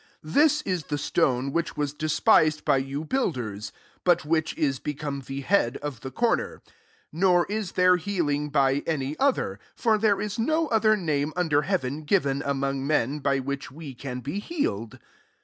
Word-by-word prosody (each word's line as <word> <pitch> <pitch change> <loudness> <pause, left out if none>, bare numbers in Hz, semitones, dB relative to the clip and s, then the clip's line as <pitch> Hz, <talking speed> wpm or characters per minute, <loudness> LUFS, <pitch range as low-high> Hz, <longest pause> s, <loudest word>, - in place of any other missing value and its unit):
11 155 +1 -8
This 300 -1 +4
is 180 -4 -2
the 145 - -2
stone 135 -1 0
irhich 170 - -2
was 145 -1 -1
despised 155 0 +3
by 145 -2 +4
you 135 +3 -3
)uilders; 120 - -2 0.3
but 175 -4 +3
which 160 0 0
is 135 -4 0
become 145 -1 -4
he 135 +1 -6
head 140 -6 +2
of 145 -6 -4
the 130 - -6
corner. 235 - -1 0.5
12 165 - -7
[Nor 180 -2 +4
s 215 -3 -2
there 180 0 +5
healingf 150 -6 -1
by 135 0 +2
any 145 -3 -1
other:] 275 -1 +1 0.3
'or 220 -2 +4
there 205 -2 +3
is 210 +2 -3
no 315 +7 +2
other 215 -1 +3
name 150 -5 -1
un 180 -2 0
ler 145 -1 +4
heaven 150 -5 -2
given 145 -4 +1
among 135 -1 -1
men, 145 -1 +1
)y 140 -1 +2
which 140 +1 -4
we 145 -1 -9
can 125 0 -6
be 145 +10 -4
healed.'' 115 - -3
150 Hz, 180 wpm, -26 LUFS, 140-185 Hz, 0.5 s, there